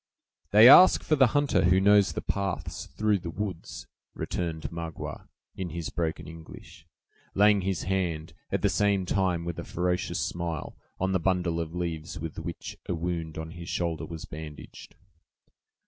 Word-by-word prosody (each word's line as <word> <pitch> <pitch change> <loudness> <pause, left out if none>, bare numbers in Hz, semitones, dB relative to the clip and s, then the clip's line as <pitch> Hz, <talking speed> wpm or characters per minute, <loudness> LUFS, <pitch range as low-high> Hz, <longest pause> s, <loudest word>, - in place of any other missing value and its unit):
"They 110 +3 +8
ask 180 +8 +9
for 155 - +2
the 135 -3 +6
hunter 145 -9 +2
who 90 +2 +5
knows 100 0 +5
the - - -4
paths 100 -3 -3
through 105 +7 0
the 85 -1 -6
woods," 95 -1 -5 0.3
returned 80 -3 -3
Magua, 85 -2 -6 0.3
in 95 -2 -4
his 85 0 -5
broken 80 -2 -3
English, 80 0 -12 0.5
laying 105 0 +5
his 95 -1 -2
hand, 85 -4 -2 0.2
at - - -1
the - - +5
same 100 -2 +1
time, 90 -3 0
with 85 -1 -4
a - - -4
ferocious 90 +1 -1
smile, 85 -3 -3 0.2
on 95 +1 0
the 95 - +2
bundle 90 -1 0
of 85 0 -4
leaves 85 -1 -4
with 80 0 -6
which - - -7
a - - 0
wound 85 -2 -3
on 80 0 -5
his 85 - -10
own - - -1
shoulder 85 -2 -2
was 80 -1 -7
bandaged. 80 -2 -10
85 Hz, 165 wpm, -28 LUFS, 80-95 Hz, 0.5 s, ask